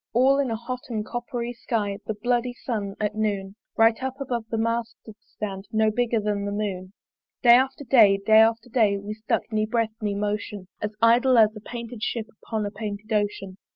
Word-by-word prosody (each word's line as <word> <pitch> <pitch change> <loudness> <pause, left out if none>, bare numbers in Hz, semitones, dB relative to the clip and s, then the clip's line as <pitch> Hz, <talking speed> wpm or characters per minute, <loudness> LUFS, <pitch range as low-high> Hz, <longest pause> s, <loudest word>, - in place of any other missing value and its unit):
All 265 +3 +4
in 275 -3 +1
a 225 - -1
hot 240 +3 -5
and 215 -3 -3
copper 240 0 -4
sky 210 -4 -2
The 220 - -2
bloody 245 +3 0
sun 205 -6 -4
at 210 -1 -1
noon, 200 -3 -2 0.2
Right 225 +1 +4
up 265 +1 -4
above 245 -4 -3
the 225 - -2
mast 230 +1 -1
did 220 - -10
stand, 195 -2 -7
No 220 0 +2
bigger 235 0 +1
than 205 -1 -1
the 200 - -2
moon. 195 -2 -4 0.5
Day 240 -1 +8
after 265 +3 +3
day, 225 -6 +6
day 220 +2 +5
after 225 +2 +3
day, 215 -4 +3
We 200 +2 -6
stuck, 215 0 -1
ne 215 0 0
breath 225 -1 0
ne 205 -1 -1
motion, 205 -1 -3
As 210 0 -3
idle 245 +2 +5
as 215 -1 +5
a - - -7
painted 235 +1 -8
Ship 225 0 -2 0.2
Upon 220 -2 -2
a 205 - -4
painted 210 0 -5
Ocean. 205 -2 -1
220 Hz, 200 wpm, -25 LUFS, 205-235 Hz, 0.5 s, Day